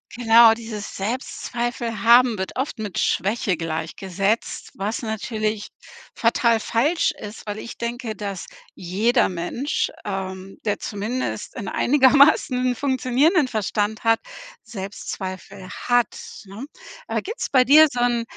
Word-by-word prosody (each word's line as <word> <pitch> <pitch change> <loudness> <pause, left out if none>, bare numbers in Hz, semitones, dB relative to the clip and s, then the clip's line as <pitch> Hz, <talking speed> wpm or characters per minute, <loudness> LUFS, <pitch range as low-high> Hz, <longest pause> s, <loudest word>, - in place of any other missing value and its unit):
Genau, 230 -1 +7
dieses 225 -2 -7
Selbstzweifel 235 +1 -3
haben 235 0 +6
wird 190 0 -4
oft 265 -2 -3
mit 210 -4 -5
Schwäche 195 -1 0
gleichgesetzt, 180 +6 -3
was 205 +4 -3
natürlich 215 -1 -3 0.5
fatal 230 0 +2
falsch 285 +12 +1
ist, 210 +1 -10
weil 210 0 -5
ich 235 - -8
denke, 235 -1 -4
dass 200 -2 -5 0.3
jeder 215 +7 +1
Mensch, 185 - -2
ähm, 190 -1 -5
der 210 -2 -1
zumindest 220 +5 -4
'nen - - -5
einigermaßen 260 -2 +4
funktionierenden 270 - +2
Verstand 215 0 -2
hat, 225 0 +3 0.4
Selbstzweifel 195 -2 -7
hat, 245 - 0 0.3
ne? 200 +7 -8 0.4
Aber - - -1
gibt's 440 +5 -5
bei 255 -2 +4
dir 305 +4 +8
so 245 - -4
'n 240 -1 +1
225 Hz, 120 wpm, -22 LUFS, 200-245 Hz, 0.5 s, dir